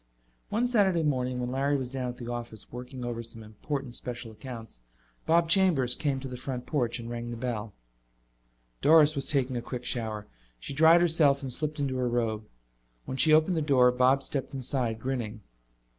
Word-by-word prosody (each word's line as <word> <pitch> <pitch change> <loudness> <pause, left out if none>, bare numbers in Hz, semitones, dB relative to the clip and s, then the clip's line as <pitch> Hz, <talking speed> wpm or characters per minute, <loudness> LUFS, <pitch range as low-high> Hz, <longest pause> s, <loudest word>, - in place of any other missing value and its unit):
One 230 +4 +1
Saturday 200 -9 +2
morning, 130 -4 -1
when 125 0 -3
Larry 140 +2 +1
was 130 -2 -5
down 130 -2 -3
at 125 - -7
the 120 - -8
office 120 -3 -6
working 125 +1 -7
over 120 -1 -3
some 115 -1 -6
important 125 +5 -5
special 120 -2 -5
accounts, 115 - -9 0.5
Bob 165 +1 +4
Chambers 165 -9 +4
came 140 -3 -1
to 135 - -5
the 125 -1 -7
front 125 -1 -5
porch 120 -6 -1
and 115 - -7
rang 120 0 -5
the 120 - -5
bell. 115 -3 -4 1.1
Doris 155 0 +6
was 140 -3 0
taking 130 -3 +1
a - - -2
quick 125 +1 -6
shower. 110 -3 -3 0.3
She 100 - -6
dried 160 +4 +6
herself 155 -5 +3
and 130 -2 -2
slipped 155 +2 -2
into 135 -2 -1
her 125 -1 0
robe. 110 -3 -1 0.6
When 130 - -5
she 155 - +5
opened 160 +4 +4
the 160 - 0
door 130 -4 +4
Bob 130 +2 +3
stepped 135 -1 -4
inside, 125 -3 0
grinning. 115 -4 -4
130 Hz, 190 wpm, -28 LUFS, 120-145 Hz, 1.1 s, Doris